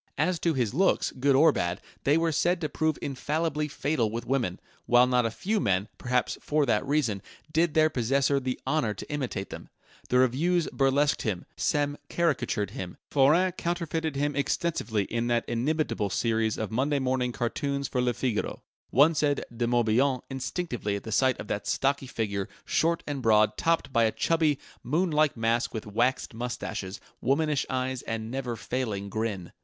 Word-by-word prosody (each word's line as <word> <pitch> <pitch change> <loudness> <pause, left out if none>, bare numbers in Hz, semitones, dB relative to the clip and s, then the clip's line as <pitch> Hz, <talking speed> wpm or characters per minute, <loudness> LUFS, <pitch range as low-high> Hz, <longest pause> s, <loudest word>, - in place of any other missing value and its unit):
As 170 +3 +1
to 165 -3 +1
his 120 -4 0
looks, 190 +7 +2
good 135 +1 +2
or 155 +4 +6
bad, 90 -7 -2 0.3
they 145 +3 +4
were 165 0 +1
said 175 +4 +1
to 155 - -1
prove 155 -2 0
infallibly 150 +2 -1
fatal 140 -5 0
with 115 +2 -4
women, 120 -8 -1 0.3
while 120 +1 +6
not 125 -2 +2
a - - -1
few 205 - -1
men, 100 - +1
perhaps 125 0 0
for 150 -1 +1
that 110 -5 +2
reason, 130 -9 +1 0.3
did 165 -1 +2
their 155 0 +6
possessor 140 +1 +1
the 130 -1 -3
honour 145 -9 0
to - - -8
imitate 125 -9 -3
them. - - -8 0.4
The 125 - +3
revues 155 +8 +2
burlesqued 140 +2 +2
him; 95 -5 -2
Sem 145 0 0
caricatured 125 - 0
him; 95 -7 -6
Forain 155 +7 +4
counterfeited 165 -3 -2
him 145 +1 0
extensively 140 -7 0
in 115 +4 -2
that 120 -1 +1
inimitable 120 -3 0
series 110 +3 0
of 110 -3 -3
Monday 140 +5 +1
morning 130 -2 0
cartoons 140 +3 -2
for 125 - -1
Le 125 -1 +1
Figaro: 120 -5 -2 0.3
one 145 +7 +5
said 145 -2 +1
"De 120 0 0
Morbihan" 120 +3 +2
instinctively 130 - -3
at 105 +2 -5
sight 130 +2 +3
of - - -6
that 105 - -3
stocky 135 0 0
figure, 100 -5 -2 0.2
short 165 +1 +1
and 145 -2 -3
broad, 110 -2 +4
topped 165 -4 0
by 115 -1 +4
a 110 - +2
chubby, 160 -1 +1 0.2
moon 160 +8 0
like 150 -3 +2
mask 115 +4 0
with 110 - -4
waxed 120 +6 0
moustaches, 110 -4 -4 0.2
womanish 150 +1 +1
eyes, 130 0 -2
and 115 0 -4
never 130 -2 -3
failing 110 -4 -3
grin. 100 -4 -3
130 Hz, 170 wpm, -28 LUFS, 115-150 Hz, 0.4 s, or